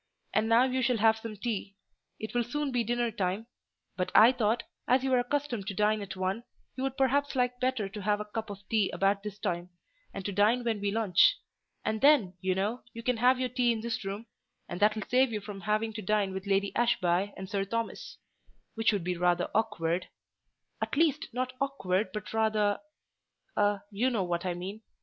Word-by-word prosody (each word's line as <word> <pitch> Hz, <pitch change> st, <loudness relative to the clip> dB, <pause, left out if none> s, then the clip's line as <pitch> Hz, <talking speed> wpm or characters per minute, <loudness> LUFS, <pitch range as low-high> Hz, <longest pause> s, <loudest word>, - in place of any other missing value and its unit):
And 215 Hz, +1 st, +2 dB
now 230 Hz, +2 st, +6 dB
you 260 Hz, 0 st, 0 dB
shall 250 Hz, -1 st, +2 dB
have 220 Hz, +1 st, +4 dB
some 220 Hz, -2 st, -7 dB
tea—it 205 Hz, 0 st, -7 dB
will 240 Hz, 0 st, +2 dB
soon 285 Hz, +4 st, -2 dB
be 245 Hz, -2 st, +1 dB
dinner 240 Hz, +1 st, 0 dB
time, 195 Hz, +2 st, -2 dB, 0.5 s
but 180 Hz, -1 st, -2 dB
I 225 Hz, +3 st, +9 dB
thought, 230 Hz, -2 st, 0 dB, 0.2 s
as 255 Hz, +1 st, +3 dB
you 265 Hz, -, 0 dB
were 255 Hz, -, +4 dB
accustomed 245 Hz, -5 st, -2 dB
to 200 Hz, -, -3 dB
dine 210 Hz, +1 st, +2 dB
at 195 Hz, -1 st, -6 dB
one, 190 Hz, +4 st, -2 dB, 0.3 s
you 260 Hz, -, -5 dB
would 270 Hz, 0 st, -2 dB
perhaps 280 Hz, +1 st, +2 dB
like 250 Hz, -1 st, 0 dB
better 255 Hz, -5 st, 0 dB
to 205 Hz, +2 st, -7 dB
have 205 Hz, +1 st, +1 dB
a 210 Hz, -, -4 dB
cup 220 Hz, +1 st, -5 dB
of 200 Hz, -1 st, -9 dB
tea 215 Hz, -4 st, +2 dB
about 195 Hz, +1 st, +1 dB
this 210 Hz, -1 st, -6 dB
time, 175 Hz, -3 st, -3 dB, 0.4 s
and 195 Hz, -1 st, -7 dB
to 205 Hz, -, -1 dB
dine 215 Hz, +5 st, +3 dB
when 225 Hz, -3 st, -1 dB
we 200 Hz, -, 0 dB
lunch: 220 Hz, -, +4 dB, 0.5 s
and 220 Hz, 0 st, -1 dB
then, 275 Hz, -10 st, +5 dB
you 185 Hz, 0 st, +1 dB
know, 210 Hz, +6 st, -1 dB
you 230 Hz, -, -8 dB
can 250 Hz, 0 st, +1 dB
have 250 Hz, +2 st, +4 dB
your 255 Hz, -1 st, 0 dB
tea 245 Hz, -1 st, +2 dB
in 225 Hz, -2 st, -2 dB
this 235 Hz, 0 st, -3 dB
room, 200 Hz, +3 st, -5 dB, 0.4 s
and 175 Hz, -, -5 dB
that 210 Hz, +1 st, +4 dB
will 215 Hz, -, -4 dB
save 255 Hz, 0 st, +3 dB
you 215 Hz, -, -2 dB
from 205 Hz, -1 st, -8 dB
having 215 Hz, +2 st, 0 dB
to 215 Hz, -, -5 dB
dine 205 Hz, -1 st, +1 dB
with 190 Hz, +1 st, -5 dB
Lady 200 Hz, 0 st, +1 dB
Ashby 200 Hz, -5 st, +2 dB
and 190 Hz, -, -6 dB
Sir 200 Hz, 0 st, -1 dB
Thomas: 230 Hz, +3 st, -4 dB, 0.6 s
which 225 Hz, 0 st, +2 dB
would 200 Hz, -4 st, -1 dB
be 180 Hz, +1 st, -1 dB
rather 175 Hz, 0 st, +1 dB
awkward—at 185 Hz, +3 st, -4 dB
least, 305 Hz, -2 st, +2 dB
not 255 Hz, +1 st, -2 dB
awkward, 200 Hz, -8 st, 0 dB
but 210 Hz, +2 st, -6 dB
rather—a—you 210 Hz, -1 st, -1 dB
know 225 Hz, -6 st, 0 dB
what 175 Hz, 0 st, -2 dB
I 175 Hz, -, -1 dB
mean. 195 Hz, +5 st, -6 dB
215 Hz, 200 wpm, -30 LUFS, 195-245 Hz, 0.6 s, I